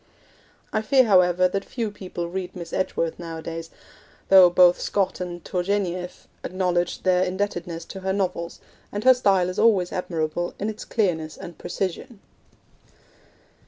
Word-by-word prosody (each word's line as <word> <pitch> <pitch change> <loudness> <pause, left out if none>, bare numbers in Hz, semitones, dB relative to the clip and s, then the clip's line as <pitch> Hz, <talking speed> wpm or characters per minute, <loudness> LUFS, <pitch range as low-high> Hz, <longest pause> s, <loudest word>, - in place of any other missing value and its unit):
I 215 - +1
fear, 260 +4 +4
however, 185 -4 +4
that 195 +2 -3
few 225 -2 -4
people 185 -4 -6
read 180 +1 -5
Miss 170 -2 -8
Edgeworth 165 -3 -1
nowadays, 165 -1 -6 0.6
though 190 -2 +9
both 175 0 +5
Scott 195 -2 -1
and 175 -2 -6
Tourgenieff 180 -1 -2 0.2
acknowledged 175 -1 -1
their 185 -1 +3
indebtedness 180 -3 -3
to 195 - -7
her 190 0 -2
novels, 180 -3 -2 0.3
and 205 +1 -4
her 260 +1 +8
style 195 -7 +2
is 185 - -4
always 195 -6 +3
admirable 175 -1 -2
in 210 - -2
its 215 - -7
clearness 160 -7 -1
and 170 - -9
precision. 195 +6 -4
180 Hz, 140 wpm, -24 LUFS, 175-200 Hz, 0.6 s, though